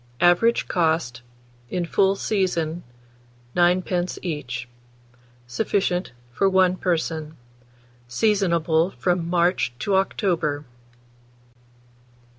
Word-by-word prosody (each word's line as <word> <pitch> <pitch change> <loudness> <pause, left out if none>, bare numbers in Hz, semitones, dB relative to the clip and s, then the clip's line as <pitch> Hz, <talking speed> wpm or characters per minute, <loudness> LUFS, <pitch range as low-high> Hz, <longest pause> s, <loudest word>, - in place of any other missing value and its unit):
Average 175 +7 +3
cost, 160 -8 0 0.5
in 180 -1 -2
full 195 +3 +2
season, 175 -5 -1 0.7
9d. 180 0 +1
each. 125 -8 -4 0.8
Sufficient 180 - -1 0.2
for 195 +11 +2
1 185 -1 +3
person. 160 -3 -2 0.7
Seasonable 170 - +2
from 175 -2 0
March 175 -7 +1
to 200 +9 -2
October. 170 -6 0
175 Hz, 80 wpm, -23 LUFS, 160-190 Hz, 0.8 s, Average